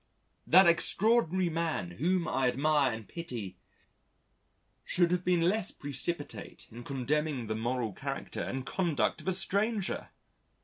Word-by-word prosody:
"... - - -43
that 190 +2 +9
extraordinary 185 +1 +3
man 160 - -2
whom 170 - 0
I 130 -1 +1
admire 140 +1 +2
and 110 -2 -7
pity, 115 - -7 1.2
should 175 -1 +1
have 180 0 0
been 175 -2 +2
less 200 +3 +1
precipitate 145 - -3
in 120 +2 -10
condemning 140 0 -2
the 110 - -3
moral 115 -1 -2
character - - -5
and 130 0 -4
conduct 170 -8 -1
of - - -13
a - - +3
stranger!" 200 +2 +1
155 Hz, 135 wpm, -30 LUFS, 125-180 Hz, 1.2 s, that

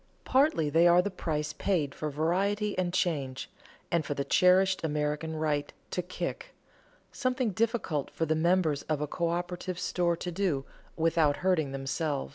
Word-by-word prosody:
Partly 260 - +3
they 165 +3 +5
are 175 +1 +6
the 205 - -2
price 150 -4 -3
paid 155 -5 0
for 155 - -4
variety 195 +8 0
and 180 -1 0
change, 145 -7 -1 0.4
and 170 -2 +2
for 145 - -3
the 140 - -1
cherished 185 +1 +4
American 150 +1 -1
right 150 -2 -1 0.2
"to 180 - -1
kick" 180 +1 -5 0.6
something 255 -3 0
difficult 215 - -1
for 165 - -2
the 160 - +1
members 160 -2 +2
of 155 -2 +1
a 150 - -2
coöperative 175 +3 -2
store 175 -1 0
to 180 - -4
do 170 -7 -1 0.3
without 160 -3 +2
hurting 160 -7 +2
themselves. 135 +2 -2
165 Hz, 155 wpm, -29 LUFS, 150-185 Hz, 0.6 s, are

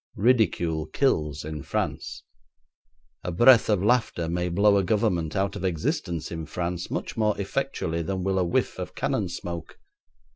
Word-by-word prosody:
Ridicule 85 -9 +2
kills 75 - 0
in 75 -1 -5
France. - - -3 1.0
A 90 - -3
breath 120 +7 +6
of 100 -3 +2
laughter 110 -7 +1
may 90 +1 -1
blow 100 +3 +4
a 100 - +2
Government 90 -6 0
out 100 0 0
of - - -6
existence 85 -2 -2
in 80 -2 -5
Paris 90 0 -3
much - - -4
more 105 -2 +1
effectually 100 -6 -2
than 95 +3 -3
will 95 0 +1
a - - +2
whiff 85 - 0
of - - -6
cannon - - -1
smoke. 85 -2 -6
90 Hz, 155 wpm, -26 LUFS, 85-105 Hz, 1.0 s, breath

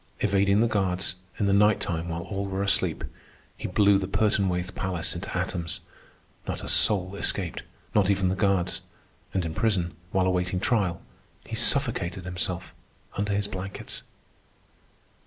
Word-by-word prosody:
Evading 100 0 +3
the 120 - +4
guards, 95 -4 0 0.2
in 105 - +1
the 100 - +3
nighttime 100 -5 +2
while 85 0 -3
all 100 +1 -3
were 95 0 -1
asleep, 95 -4 +2 0.5
he - - -5
blew 100 +1 +4
the 95 - -3
Pertonwaithe 95 -3 +1
palace 90 -4 -2
into 85 +1 -4
atoms. 90 -2 -2 0.7
Not - - -3
a - - -5
soul 95 -2 +3
escaped, 95 -3 -1 0.3
not 100 -2 +4
even 95 -2 +2
the 95 - +1
guards. 95 -2 +1 0.5
And 95 -3 0
in 80 - -3
prison, 90 -4 +1 0.2
while 95 -1 +2
awaiting 90 0 +1
trial, 95 -6 +1 0.4
he - - -5
suffocated 90 +1 +2
himself 90 -1 -3 0.4
under 100 0 0
his 100 0 0
blankets. 95 0 -6
95 Hz, 145 wpm, -27 LUFS, 90-100 Hz, 0.7 s, the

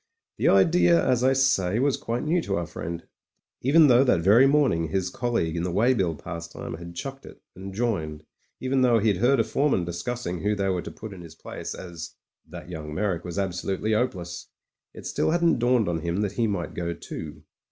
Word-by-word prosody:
The - - +2
idea, 85 -3 +4
as 125 -1 +2
I 130 +1 +4
say, 110 -8 +2
was 135 +2 +2
quite 120 +1 -3
new 165 +3 +1
to 100 -10 -2
our 85 - -1
friend. 85 +2 -6 0.6
Even 155 +5 +6
though 125 -2 +6
that 125 -11 +3
very 110 +9 +6
morning 135 - +2
his 95 +2 -1
colleague 115 -10 -1
in 85 - -1
the 90 - -1
weigh 110 +9 +3
bill 90 -9 0
pastime 85 +2 -7
had 85 +1 -9
chucked 135 +7 -6
it - - -13 0.2
and 95 +1 -8
joined, 90 -9 -2 0.4
even 130 +1 0
though 120 -2 +4
he'd 105 -3 +2
heard 125 +6 +3
a - - +4
foreman 115 -4 +1
discussing 90 +1 -4
who 105 +1 +1
they 100 -1 0
were 90 -2 0
to - - -7
put 110 -2 -9
in 90 - -10
his 80 -2 -12
place - - -7
as 85 -3 -8 0.3
"that - - -9
young 75 -3 -7
Meyrick 95 -3 -1
was 90 -2 -6
habsolutely 95 +2 -1
'opeless," 95 -7 -2 0.5
it - - -10
still - - 0
hadn't 170 -4 +2
dawned 120 -2 +2
on 85 -2 -1
him 85 +4 -2
that 105 -2 -1
he 115 +3 0
might 100 -5 -3
go 85 -1 -3
too. 80 -2 -8
95 Hz, 205 wpm, -25 LUFS, 85-125 Hz, 0.6 s, Even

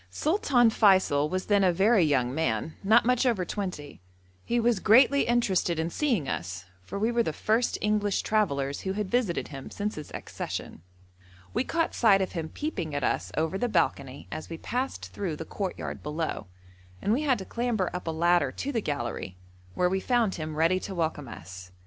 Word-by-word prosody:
Sultan 260 - +2
Feysul 185 -9 +4
was 185 +2 -2
then 205 -1 +3
a 185 - +5
very 195 +3 +4
young 130 -5 +1
man, 140 -1 -1
not 220 +4 +5
much 250 +1 +3
over 230 -8 +1
twenty. 180 - -5 0.4
He 240 - 0
was 235 -3 +2
greatly 255 +7 +5
interested 195 -8 +1
in 160 +1 -1
seeing 235 - 0
us, 90 -2 -4 0.2
for 90 - -7
we 220 +4 +1
were 235 0 +2
the 225 - -1
first 225 +9 0
English 210 -1 +1
travellers 140 -11 0
who 190 - -2
had 205 -1 -3
visited 240 -8 0
him 135 -2 -8
since 210 +1 -3
his 150 - -8
accession. - - -6 0.7
We 240 - +1
caught 330 +4 -1
sight 210 -5 +5
of 190 - -1
him 160 -2 -4
peeping 185 - -4
at 145 - -1
us - - -1
over 160 +5 0
the 245 - 0
balcony 135 -9 -1
as 155 - -6
we 165 - -5
passed 250 +9 -4
through 180 -6 -3
the 160 - -7
courtyard 195 +1 -4
below, 155 - -3 0.5
and 205 - +1
we 265 - +1
had 275 -5 +2
to 190 - -7
clamber 235 -5 -1
up 180 -1 -5
a - - +1
ladder 170 -3 +2
to 285 - -3
the 230 -5 -1
gallery, 120 - -4 0.4
where 180 - +2
we 190 +2 0
found 235 -2 +1
him 155 -1 -5
ready 165 +4 +3
to 190 0 -6
welcome 160 -4 -2
us. 90 -4 -10
190 Hz, 190 wpm, -27 LUFS, 155-230 Hz, 0.7 s, a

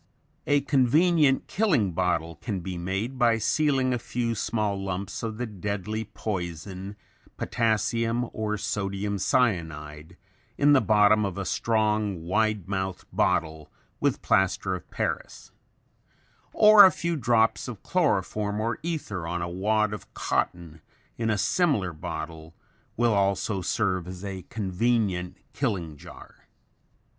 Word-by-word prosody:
A 145 0 +3
convenient 145 +2 +3
killing 150 - +1
bottle 85 -2 -1
can 100 -6 -4
be 90 +1 -5
made 95 +9 -3
by 120 -2 +4
sealing 135 +2 +1
a 125 - -1
few 115 0 -2
small 105 -2 -1
lumps 95 0 -4
of 110 -1 -4
the 125 - -2
deadly 105 +1 -4
poison, 95 -1 -5 0.4
potassium 115 +1 0
or 105 -1 -2
sodium 100 0 -2
cyanide, 80 - -1 0.4
in 145 +1 +5
the 135 - +5
bottom 105 0 +4
of 100 -3 -3
a 100 - -3
strong, 105 -4 0
wide 105 0 0
mouthed 95 -2 -3
bottle, 80 -2 0 0.3
with - - 0
plaster 95 0 +2
of 90 - -7
Paris; - - -4 1.0
or 215 -1 +8
a 190 - +8
few 170 0 -2
drops 115 -4 +2
of 115 -6 -8
chloroform 105 - 0
or 115 +2 -1
ether 145 - -4
on 85 0 -2
a - - -2
wad 105 +4 +1
of 105 - -9
cotton 85 -3 -2 0.3
in 115 -1 -1
a 105 - +1
similar 105 - +1
bottle, 80 +1 -7 0.4
will 120 -1 +3
also 100 0 0
serve 90 -1 -1
as 90 +1 -8
a 95 -1 -5
convenient 100 -3 -1 0.2
killing 95 - -2
jar. 70 - -14
105 Hz, 130 wpm, -26 LUFS, 90-115 Hz, 1.0 s, or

